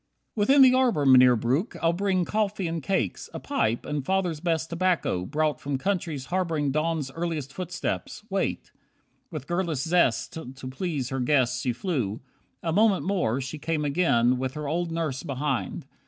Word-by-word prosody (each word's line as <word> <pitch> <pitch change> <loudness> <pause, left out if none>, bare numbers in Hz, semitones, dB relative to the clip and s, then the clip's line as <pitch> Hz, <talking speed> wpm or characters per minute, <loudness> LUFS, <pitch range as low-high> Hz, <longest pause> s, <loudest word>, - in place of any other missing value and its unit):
30 - - -5
"Within 270 +7 +5
the 255 -1 +7
arbour, 245 - +2
Mynheer 130 -2 +7
Breuck, 130 - 0
I'll 165 0 +2
bring 185 -1 +1
Coffee 210 0 -1
and 165 0 -3
cakes, 165 - -1
a - - -3
pipe, 115 +2 -1
and 150 -2 -2
Father's 180 -1 0
best 165 -1 -1
Tobacco, 170 - 0
brought 155 +1 0
from 140 -1 -2
countries 170 -5 -2
harbouring 165 -5 0
Dawn's 155 -2 -1
earliest 160 -4 -4
footstep. 180 0 -3 0.2
Wait." 195 -2 -2 0.6
With 155 -6 -6
girlish 175 -2 -1
zest 165 -7 +2 0.2
To 130 -1 -8
please 135 -1 -3
her 135 - -2
guest 125 -1 +2
she 125 - 0
flew. 120 - -2 0.4
A 165 - -1
moment 205 0 +3
more 175 - 0
She 130 +4 -6
came 155 0 -1
again, 130 -6 +2
with 130 +1 -3
her 150 -1 -4
old 170 +3 -1
nurse 155 -6 -2
behind. 140 -1 -3
155 Hz, 170 wpm, -26 LUFS, 135-180 Hz, 0.6 s, the